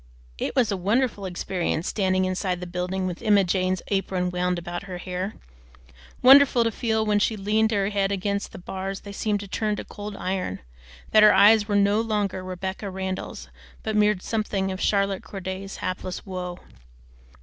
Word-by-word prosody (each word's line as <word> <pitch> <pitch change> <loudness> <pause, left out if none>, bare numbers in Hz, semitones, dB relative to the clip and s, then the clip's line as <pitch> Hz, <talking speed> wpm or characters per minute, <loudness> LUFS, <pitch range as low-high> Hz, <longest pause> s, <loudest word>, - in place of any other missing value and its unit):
It - - -2
was 240 -5 +3
a 200 - 0
wonderful 205 +1 0
experience 175 -2 -2
standing 185 -2 +1
inside 185 -1 -1
the 180 - -5
building 180 +1 -3
with 180 -2 -4
Emma 205 -2 +4
Jane's 185 0 0
apron 190 -2 0
wound 180 0 0
about 175 +2 -5
her 185 -2 -6
hair; 185 +3 -4 0.9
wonderful 265 -2 +7
to 230 - 0
feel 220 -1 0
that - - -4
when 205 0 +3
she 215 +1 +1
leaned 215 +2 +2
her 200 -3 +1
head 200 -1 0
against 200 +1 -2
the - - -9
bars 190 +2 -5
they 200 - -9
seemed 205 0 -1
to 200 - -8
turn 210 +2 -1
to - - -6
cold 205 0 -7
iron; 185 - -3 0.5
that 215 - +6
her 210 -2 +8
eyes 205 +2 +6
were 205 - 0
no 205 +2 +3
longer 205 -4 -1
Rebecca 190 +2 -5
Randall's 190 0 -5 0.3
but 220 -1 -2
mirrored 210 -3 +3
something 205 -3 -1
of 185 - -5
Charlotte 195 -2 +1
Corday's 190 0 -6
hapless 185 0 -4
woe. 180 -2 -5
195 Hz, 180 wpm, -25 LUFS, 185-210 Hz, 0.9 s, her